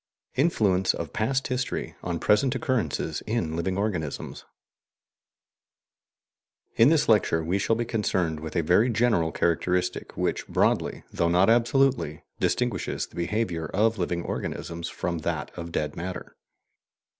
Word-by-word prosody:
INFLUENCE 105 - +2
OF 80 -3 -5
PAST 130 +4 0
HISTORY 130 0 -2
ON 85 -1 -2
PRESENT 125 +5 +3
OCCURRENCES 120 - -1
IN 100 -8 -1
LIVING 95 +3 -1
ORGANISMS 90 -8 -3 2.3
In 115 +4 +6
this 155 -2 +3
lecture 100 -7 +3
we 90 +5 0
shall 115 +3 +2
be 120 +1 -1
concerned 95 -8 0
with 80 0 -7
a 85 - +2
very 90 +10 +4
general 110 -8 +2
characteristic 90 +2 0
which - - -1
broadly, - - +1
though 85 - +1
not 90 +5 +4
absolutely, 120 - +2 0.2
distinguishes - - 0
the - - -19
behaviour 85 -3 -1
of 110 +1 +2
living 85 -1 -1
organisms 85 0 -4
from 85 -1 -3
that - - -3
of 85 -1 -6
dead 75 -2 -2
matter. 90 +1 -6
95 Hz, 135 wpm, -26 LUFS, 85-115 Hz, 2.3 s, In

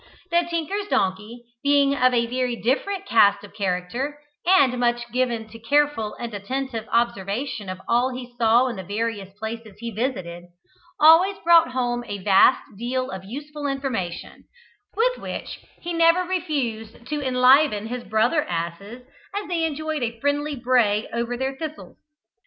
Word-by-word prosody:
The 340 0 +2
tinker's 360 +5 -2
donkey, 210 - -1 0.2
being 285 -1 +3
of 255 -2 +4
a 235 -1 +2
very 250 0 -1
different 300 - -1
cast 205 -2 +4
of 205 - -13
character, 200 +9 -2 0.3
and 275 -9 +4
much 240 0 +1
given 240 -3 0
to 230 +1 -12
careful 280 -2 +1
and 235 -2 -6
attentive 225 +2 -4
observation 230 -1 -1
of 185 0 -5
all 245 +2 +2
he 250 -1 -8
saw 235 +1 +4
in 235 -5 -4
the 190 - -6
various 205 0 -3
places 220 -1 -6
he 235 +1 -6
visited, 185 -7 -4 0.5
always 330 +6 +6
brought 335 -6 +5
home 245 -1 -1
a 205 - -4
vast 195 +6 +4 0.2
deal 255 +2 -2
of 190 0 -7
useful 290 +6 -6
information, 265 -11 -4 0.5
with - - +1
which - - -6 0.2
he 345 - -4
never 335 +2 +4
refused 260 - -3
to 300 +1 -3
enliven 255 -3 +4
his 245 +2 -5
brother 225 +8 +2
asses 175 +8 -5 0.3
as 410 0 -3
they 340 -2 0
enjoyed 310 -1 -3
a 230 -1 -3
friendly 290 +2 0
bray 240 -4 +2
over 235 +1 -2
their 265 +1 -2
thistles. 310 +2 -8
245 Hz, 150 wpm, -23 LUFS, 220-290 Hz, 0.5 s, always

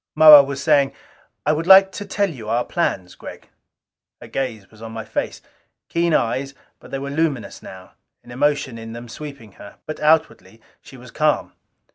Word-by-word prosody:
Moa 155 -2 +10
was 140 0 -5
saying, 140 -3 +3 0.5
"I 150 - +3
would 160 +3 -3
like 195 0 +8
to 205 - -7
tell 200 -1 -1
you 115 -7 -9
our 120 +2 0
plans, 95 - -2
Gregg." - - -12 0.7
Her - - -12
gaze 115 -7 -5
was 110 0 -18
on 115 0 -8
my 110 -1 -7
face. - - -4 0.5
Keen 170 0 0
eyes, 135 +1 -1 0.2
but - - -15
they 135 - -4
were 140 +1 -6
luminous 145 -5 -2
now - - -12 0.3
an 120 - -14
emotion 145 -2 -1
in 115 0 -9
them 120 +1 -9
sweeping 140 -3 -10
her. 100 - -12
But 155 - -7
outwardly 150 -9 0 0.2
she 135 - -14
was 125 -1 -14
calm. 150 -1 0
140 Hz, 180 wpm, -20 LUFS, 115-155 Hz, 0.7 s, Moa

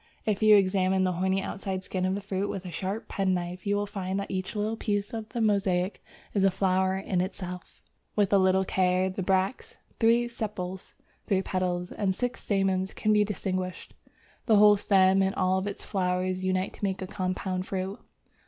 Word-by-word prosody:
If 210 -1 0
you 215 -1 +7
examine 190 -1 +3
the 185 - +2
horny 190 +2 0
outside 190 -1 -4
skin 185 0 -2
of 190 - 0
the 200 - -4
fruit 195 0 -2
with 190 -1 -5
a 180 - -6
sharp 190 +6 -4
penknife, 185 -1 -2
you 200 - +2
will 205 0 0
find 195 -2 -3
that 200 - -5
each 190 +2 -3
little 215 +2 -1
piece 205 -1 -2
of 220 -1 -5
the 240 - -3
mosaic 195 -3 +1 0.3
is 200 - +2
a 195 - +6
flower 190 0 +1
in 190 -2 -1
itself; 180 -1 -6 0.4
with 205 -2 +2
a 200 - +6
little 190 0 +3
care 185 0 +1
the 190 - -4
bracts, 190 +4 -1 0.2
three 235 +1 +4
sepals, 200 -5 -5 0.3
three 190 -1 +2
petals, 180 -1 -2
and 190 -3 -1
six 245 +3 -3
stamens 195 -2 0
can 215 - +2
be 210 0 +5
distinguished. 185 -3 -4 0.5
The 220 - +5
whole 210 0 +7
stem 195 -1 +4
and 190 0 +1
all 190 +1 +1
its 200 - -5
flowers 185 0 -1
unite 185 0 0
to - - -14
make 190 -1 -1
a - - -3
compound 185 0 -3
fruit. 190 +1 -3
190 Hz, 190 wpm, -28 LUFS, 185-205 Hz, 0.5 s, you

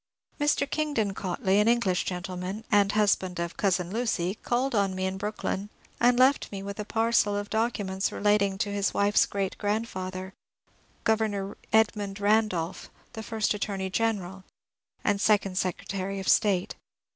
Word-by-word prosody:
Mr. 290 -1 +2
Kingdon 285 -10 -1
Cautley, 190 +1 0
an 210 - +2
English 230 -6 +2
gentleman, 185 +3 -4
and 205 -1 +4
husband 190 -4 +2
of 170 0 -3
cousin 180 -3 0
Lucy, 205 -6 0
called 245 +4 -1
on 200 -3 +1
me 185 0 -2
in 190 0 -2
Brooklyn, 205 -1 -3 0.3
and 245 0 +4
left 260 +2 +4
with - - -18
me 195 -1 -6
a - - -6
parcel 225 -2 +2
of 205 0 -5
documents 205 -4 -1
relating 205 -2 +2
to 205 +1 -1
his 200 -1 0
wife's 205 +1 +3
great 195 -2 -2
grandfather. 190 -3 -3 0.7
Gov. 210 -3 0 0.2
Edmimd 210 -2 +2
Bandolph, 205 -5 +1 0.3
first 220 -1 -1
Attorney 195 -2 -3
General, 195 -4 -1 0.6
and 205 -1 +1
second 200 -3 +2
Secretary 195 +1 -3
of 190 - -6
State. 195 -4 +3
205 Hz, 145 wpm, -27 LUFS, 190-220 Hz, 0.7 s, and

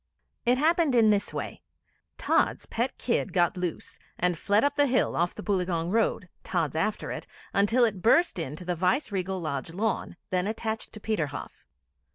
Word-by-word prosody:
It 250 +1 +5
happened 320 -1 +3
this 215 -3 +4
way: - - -5 0.6
Tods' - - +1
pet 240 +3 -2
kid 230 -6 -1
got 175 0 +3
loose, 180 -3 -4 0.2
and 180 0 +1
fled 205 +6 +2
up 285 0 +2
the 290 0 +4
hill, 255 -2 +1
off 175 +1 0
the 210 - -7
Boileaugunge 180 -4 0
Road, 220 -4 +1 0.2
Tods 165 -6 -1
after 185 +7 -1
it, - - -6 0.3
until 225 +5 +4
it 205 -5 -2
burst 240 - +4
in 150 -3 -4
to 180 - -8
the 180 - 0
Viceregal 190 - 0
Lodge 155 -2 -3
lawn, 215 0 -2 0.2
then 180 +1 +1
attached 220 0 -3
to 215 - -8
'Peterhoff.' 165 -10 -3
200 Hz, 170 wpm, -27 LUFS, 175-230 Hz, 0.6 s, It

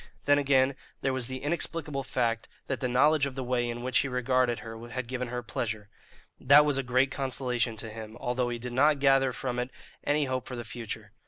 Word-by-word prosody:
Then, 145 0 +5
again, 135 -1 +3 0.3
there 135 - +1
was 130 -3 0
the 130 0 -6
inexplicable 150 -2 -1
fact 115 -3 -1 0.2
that 130 - -2
the 130 - 0
knowledge 140 +3 +4
of 135 - -7
the 135 - -3
way 120 -1 0
in 120 0 -5
which 130 0 +2
he 140 - 0
regarded 125 -1 +1
her 115 +1 -8
had 130 +2 -3
given 125 0 -3
her 125 +1 -4
pleasure; 110 -2 -4 0.5
that 145 +3 +7
was 145 -2 +2
a - - +2
great 130 +1 +2
consolation 125 -4 -1
to 110 +1 -3
him, 110 0 -8
although 125 0 -1
he 120 - -2
did 120 +1 -6
not 145 +3 +4
gather 135 -1 +4
from 125 0 -3
it 125 +1 -2 0.3
any 145 0 +2
hope 130 -1 -3
for 130 - -5
the 120 -1 -6
future. 110 -2 -6
130 Hz, 220 wpm, -29 LUFS, 120-135 Hz, 0.5 s, that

